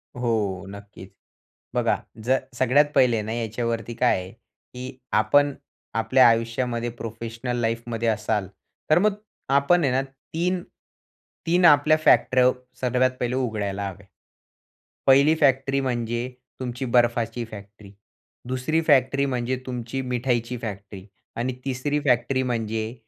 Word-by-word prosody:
हो, 110 Hz, -6 st, -1 dB
नक्कीच. 100 Hz, -1 st, -11 dB, 0.6 s
बघा -, -, +2 dB, 0.3 s
जर 130 Hz, +2 st, +3 dB, 0.2 s
सगळ्यात 130 Hz, +3 st, +4 dB
पहिले 120 Hz, -3 st, +4 dB
ना 110 Hz, -, -5 dB
याच्यावरती 115 Hz, 0 st, -3 dB
काय 125 Hz, -1 st, +2 dB
आहे, 90 Hz, +1 st, -9 dB
की 125 Hz, +2 st, -12 dB
आपण 140 Hz, +7 st, +3 dB, 0.4 s
आपल्या 125 Hz, +3 st, +5 dB
आयुष्यामध्ये, 115 Hz, +1 st, 0 dB
प्रोफेशनल 115 Hz, +1 st, -5 dB
लाईफमध्ये 115 Hz, 0 st, -2 dB
असाल, 110 Hz, -2 st, 0 dB, 0.4 s
तर 155 Hz, -, +6 dB
मग 210 Hz, +2 st, +2 dB, 0.4 s
आपण 170 Hz, +4 st, +3 dB
आहे 130 Hz, -, +2 dB
ना 130 Hz, -, +2 dB, 0.3 s
3- 175 Hz, +2 st, 0 dB, 0.8 s
3 175 Hz, +2 st, +3 dB
आपल्या 155 Hz, -1 st, +6 dB
फॅक्टऱ्या 130 Hz, -4 st, +4 dB, 0.3 s
सर्वात 130 Hz, 0 st, +2 dB
पहिले 125 Hz, 0 st, -1 dB
उघडायला 105 Hz, -6 st, -2 dB
हव्या. 95 Hz, +1 st, -11 dB, 1.0 s
1ली 140 Hz, +3 st, +6 dB
फॅक्ट्री 135 Hz, -1 st, +2 dB
म्हणजे 120 Hz, -1 st, -2 dB, 0.3 s
तुमची 125 Hz, +1 st, -4 dB
बर्फाची 120 Hz, -1 st, +1 dB
फॅक्ट्री, 100 Hz, -1 st, -12 dB, 0.6 s
2री 130 Hz, +6 st, 0 dB
फॅक्ट्री 140 Hz, -2 st, +3 dB
म्हणजे 125 Hz, -1 st, -1 dB
तुमची 125 Hz, +1 st, -4 dB
मिठाईची 125 Hz, -1 st, -1 dB
फॅक्ट्री 100 Hz, -3 st, -7 dB, 0.3 s
आणि 125 Hz, +2 st, -2 dB
3री 140 Hz, +3 st, -1 dB
फॅक्टरी 130 Hz, +1 st, +2 dB
म्हणजे 115 Hz, -2 st, -2 dB
120 Hz, 120 wpm, -24 LUFS, 115-130 Hz, 1.0 s, तर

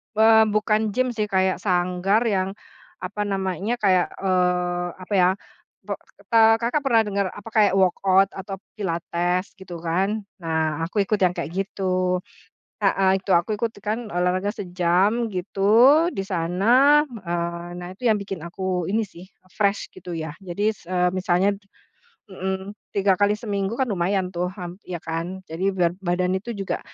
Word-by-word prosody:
Eee, 220 Hz, 0 st, +6 dB
bukan 215 Hz, +1 st, +1 dB
gym 255 Hz, -1 st, +1 dB
sih, 215 Hz, -2 st, -2 dB
kayak 190 Hz, -1 st, +1 dB
sanggar 185 Hz, +3 st, +1 dB
yang 195 Hz, -3 st, 0 dB, 0.5 s
apa 205 Hz, +3 st, -4 dB
namanya, 195 Hz, +3 st, -1 dB
kayak, 185 Hz, -2 st, +4 dB, 0.2 s
eee, 180 Hz, -1 st, +1 dB, 0.2 s
apa 205 Hz, -, -6 dB
ya, 180 Hz, 0 st, +5 dB, 0.6 s
pe -, -, -2 dB, 0.7 s
Kakak 245 Hz, +6 st, 0 dB
pernah 230 Hz, -4 st, +5 dB
denger 200 Hz, -1 st, 0 dB
apa, 205 Hz, +2 st, -10 dB
kayak 210 Hz, -3 st, +4 dB
workout 190 Hz, +1 st, +3 dB
atau 195 Hz, 0 st, -6 dB, 0.2 s
pilates 175 Hz, 0 st, -1 dB
gitu 180 Hz, -2 st, -9 dB
kan. 195 Hz, +6 st, 0 dB, 0.2 s
Nah 160 Hz, -1 st, -1 dB
aku 200 Hz, +2 st, +1 dB
ikut 210 Hz, +1 st, 0 dB
yang 180 Hz, -, +5 dB
kayak 150 Hz, -, -4 dB
gitu, 185 Hz, -2 st, 0 dB, 0.7 s
heeh, 195 Hz, -1 st, +3 dB
itu 195 Hz, -, -8 dB
aku 170 Hz, +5 st, +2 dB
ikut 230 Hz, 0 st, -1 dB
kan 215 Hz, +2 st, -1 dB, 0.2 s
olahraga 185 Hz, +3 st, +1 dB
sejam 190 Hz, +4 st, +1 dB
gitu 185 Hz, +2 st, -5 dB, 0.5 s
di 195 Hz, -, -2 dB
sana. 220 Hz, -, +4 dB
Eee, 175 Hz, -5 st, -4 dB
nah 175 Hz, 0 st, -7 dB
itu 225 Hz, +6 st, -12 dB
yang 220 Hz, -, +5 dB
bikin 195 Hz, -2 st, -5 dB
aku 180 Hz, -1 st, -2 dB
ini 220 Hz, +2 st, +1 dB
sih, 175 Hz, -1 st, -13 dB, 0.3 s
fresh 200 Hz, -1 st, +1 dB
gitu 175 Hz, -, -8 dB
ya, 160 Hz, -2 st, -4 dB
jadi 180 Hz, +3 st, -4 dB
s -, -, -20 dB
eee, 180 Hz, -1 st, +2 dB
misalnya 185 Hz, +2 st, +2 dB, 0.7 s
mhm, 190 Hz, +1 st, -4 dB, 0.2 s
3 195 Hz, -1 st, +3 dB
kali 205 Hz, +1 st, +4 dB
seminggu 200 Hz, -1 st, -2 dB
kan 260 Hz, -, +2 dB
lumayan 185 Hz, 0 st, 0 dB
tuh, 175 Hz, +1 st, 0 dB
hmm, 180 Hz, -2 st, -7 dB
ya 175 Hz, -2 st, -4 dB
kan, 170 Hz, +4 st, -4 dB
jadi 170 Hz, +4 st, -3 dB
biar 175 Hz, -2 st, +2 dB
badan 180 Hz, 0 st, 0 dB
itu 235 Hz, +5 st, -8 dB
juga 195 Hz, -1 st, -3 dB
190 Hz, 155 wpm, -23 LUFS, 180-205 Hz, 0.7 s, Eee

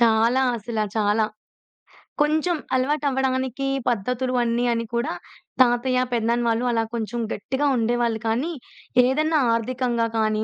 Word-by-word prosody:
చాలా 230 Hz, +2 st, +4 dB, 0.2 s
అసలా 220 Hz, 0 st, -2 dB
చాలా. 215 Hz, 0 st, +2 dB, 1.0 s
కొంచెం 315 Hz, +3 st, +2 dB, 0.2 s
అలవాటవ్వడానికి 265 Hz, -1 st, 0 dB, 0.2 s
పద్ధతులు 250 Hz, +3 st, -1 dB
అన్నీ 240 Hz, +1 st, 0 dB
అని 230 Hz, 0 st, -2 dB
కూడా 235 Hz, -4 st, -1 dB, 0.5 s
తాతయ్య 250 Hz, +1 st, +3 dB
పెదానాన్న 235 Hz, +1 st, +1 dB
వాళ్ళు 230 Hz, +2 st, 0 dB
అలా 225 Hz, -1 st, +1 dB
కొంచెం 235 Hz, +1 st, -3 dB
గట్టిగా 270 Hz, +6 st, -2 dB
ఉండేవాళ్ళు 235 Hz, -1 st, 0 dB
కానీ, 250 Hz, +10 st, 0 dB, 0.5 s
ఏదన్నా 310 Hz, +4 st, +2 dB
ఆర్థికంగా 240 Hz, 0 st, 0 dB
కానీ 215 Hz, 0 st, +1 dB
240 Hz, 115 wpm, -23 LUFS, 230-260 Hz, 1.0 s, చాలా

